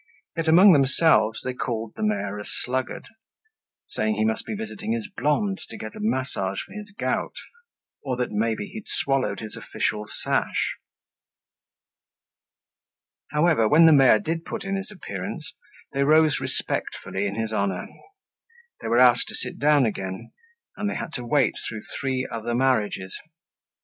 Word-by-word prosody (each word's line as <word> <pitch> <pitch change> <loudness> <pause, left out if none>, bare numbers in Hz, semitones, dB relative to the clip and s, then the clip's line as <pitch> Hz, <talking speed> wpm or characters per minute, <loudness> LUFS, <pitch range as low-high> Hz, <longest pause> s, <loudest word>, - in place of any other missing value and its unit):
Yet 165 -1 -2
among 180 +4 +8
themselves 135 -6 +3
they 130 - -2
called 115 -3 -3
the - - -7
mayor 105 -1 -1
a - - -5
sluggard, 125 +6 -4 0.8
saying 110 0 0
he 110 +1 +1
must 110 0 -1
be - - -3
visiting 220 +1 -4
his 230 -3 -3
blonde 190 +7 +1
to - - -8
get 110 - -7
a - - -8
massage 140 -11 -1
for - - -17
his 210 0 -8
gout, - - -1 0.7
or 130 -2 -1
that 125 -1 -1
maybe 110 - 0
he'd 215 +1 -9
swallowed 135 -1 -1
his 110 -1 -7
official 105 0 -2 0.2
sash. - - 0 2.5
However, 150 -6 +3
when 160 +7 +7
the 160 - +8
mayor 135 -6 +7
did 165 +9 -3
put 225 +3 -5
in 195 0 -2
his 195 0 -4
appearance, 100 - -6 0.4
they 140 - +2
rose 155 0 +4
respectfully 100 +2 -3
in 100 - -4
his 110 0 -2
honor. 100 -3 -1 0.9
They - - -4
were 120 - +2
asked 125 -1 +6
to - - -7
sit - - -7
down 145 -2 +4
again 95 -3 -4 0.5
and 205 - -1
they - - -3
had 160 - -5
to 125 - -4
wait 135 -1 +3 0.2
through 110 -2 -6 0.2
three 130 -2 -1
other 115 +1 -3
marriages. 110 -7 +1
130 Hz, 155 wpm, -25 LUFS, 110-160 Hz, 2.5 s, among